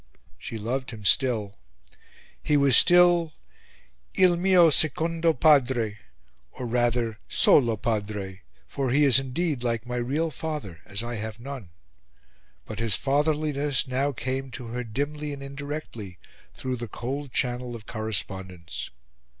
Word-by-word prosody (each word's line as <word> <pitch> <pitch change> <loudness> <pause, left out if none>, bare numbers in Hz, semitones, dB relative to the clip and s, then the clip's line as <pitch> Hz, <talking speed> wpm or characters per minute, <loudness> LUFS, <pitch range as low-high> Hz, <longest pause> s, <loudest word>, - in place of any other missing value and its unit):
She 115 - -6
loved 125 +5 -3
him 110 -4 -8
still; 110 - +2 0.8
he 150 - +2
was 140 -2 +4
still 175 -2 +6 0.8
"il 180 -2 +5
mio 175 -2 +5
secondo 165 +3 +2
padre 125 -8 +2 0.5
or, 125 - -6
rather, 120 -2 0
solo 115 -5 +4
padre, 105 -3 -3 0.3
for 135 - -2
he 140 +4 +3
is 135 -3 +5
indeed 135 0 -2
like 115 -1 -1
my 125 0 -4
real 145 +7 -1
father, 140 - -6
as 100 +3 -2
I 120 -1 -5
have 110 +1 -6
none;" 130 -6 -8 1.0
but 110 - -7
his 115 -4 +4
fatherliness 145 0 0
now 135 +3 0
came 130 +1 -4
to 120 -2 -7
her 125 +1 -4
dimly 145 +6 -4
and 140 -1 -8
indirectly, 140 - -7 0.4
through 130 -1 -4
the 120 0 -5
cold 130 +6 -5
channel 125 -1 -2
of 110 -2 -10
correspondence. 95 -5 -4
125 Hz, 135 wpm, -26 LUFS, 110-145 Hz, 1.0 s, still